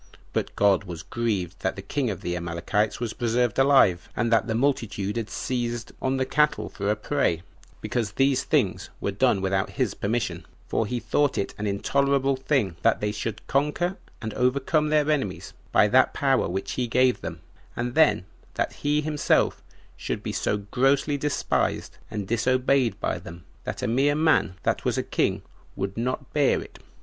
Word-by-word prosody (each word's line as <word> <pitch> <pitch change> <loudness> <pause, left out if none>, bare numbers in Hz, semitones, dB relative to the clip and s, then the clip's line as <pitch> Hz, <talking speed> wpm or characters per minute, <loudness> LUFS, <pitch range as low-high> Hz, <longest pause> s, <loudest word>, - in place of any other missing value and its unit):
But - - -2
God 100 -1 +3
was 85 -3 -7
grieved 100 -7 -2
that 95 - -1
the 95 - -8
king 130 +5 -1
of 100 - -4
the 90 - -2
Amalekites 85 +5 -1
was 115 -2 -3
preserved 120 0 0
alive, 135 -11 +4
and 115 -1 +1
that 115 - +3
the 110 - -1
multitude 110 -6 0
had 115 -2 -3
seized 120 -2 -3
on 130 0 0
the 130 - +1
cattle 150 +2 +1
for 100 0 -3
a 105 - +3
prey, 105 - 0 0.4
because 115 -5 -2
these 135 +2 +2
things - - 0
were 100 - -1
done 105 -1 +2
without 95 0 0
his - - 0
permission; 110 +4 -2 0.2
for 110 - 0
he 125 +2 -2
thought 135 +5 +1
it 100 - -2
an 105 - -1
intolerable 140 +6 +1
thing 130 - 0
that 115 - +3
they 105 0 -1
should 105 +1 -5
conquer 150 +6 0 0.3
and 110 -1 -3
overcome 145 +5 +1
their 150 -1 +3
enemies 135 -11 -2 0.2
by - - +5
that - - +4
power - - +2
which 95 +2 -3
he 125 -1 -1
gave 125 +1 +3
them, 80 -1 -6 0.3
and 120 +1 -2
then 155 -11 +4 0.3
that - - -1
he 150 +1 +2
himself 150 -1 +1 0.3
should - - -4
be - - -3
so 105 - 0
grossly 135 +7 +1
despised 145 0 -1
and 105 -3 -4
disobeyed 125 0 +2
by - - -1
them, 85 -1 -11 0.2
that - - -4
a - - +1
mere 135 +5 +2
man 155 - +2
that - - 0
was - - 0
a - - 0
king - - 0 0.3
would 95 +1 -3
not 125 +3 -3
bear 145 -2 +3
it. - - -11
120 Hz, 180 wpm, -25 LUFS, 100-135 Hz, 0.4 s, by